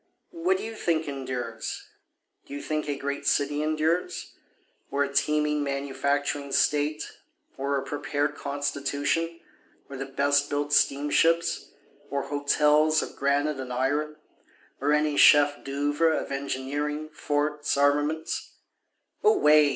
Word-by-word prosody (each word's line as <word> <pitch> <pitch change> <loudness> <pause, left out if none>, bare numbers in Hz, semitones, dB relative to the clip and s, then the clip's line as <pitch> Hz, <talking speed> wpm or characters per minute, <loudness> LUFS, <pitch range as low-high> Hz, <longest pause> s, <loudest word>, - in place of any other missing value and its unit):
What 360 +2 +1
do - - -6
you 225 - -5
think 165 -7 -1
endures? 125 -5 -5 0.6
Do 140 - -7
you 145 - -5
think 155 -1 -2
a 140 - -1
great 140 0 -4
city 145 +1 +1
endures? 155 +3 -1 0.6
Or 140 +1 +1
a 140 0 -4
teeming 150 0 +1
manufacturing 140 +1 -1
state? 150 +2 +1 0.5
or 140 +1 -1
a 135 - -2
prepared 145 +1 -2
constitution? 145 +4 -2 0.5
or 140 - -8
the 135 +1 -5
best 145 +1 +1
built 145 0 -1
steamships? 150 +5 +2 0.4
Or 140 0 -2
hotels 150 +2 +3
of - - -8
granite 140 +1 0
and 130 -1 -6
iron? 145 +4 -1 0.6
or 145 +2 +1
any 150 -1 +2
chef 145 0 +6
d'oeuvres 145 +4 +1
of - - -7
engineering, 145 +3 -3
forts, 150 0 -1
armaments? 145 +3 0 0.7
Away! 155 - +5
145 Hz, 125 wpm, -26 LUFS, 140-150 Hz, 0.7 s, chef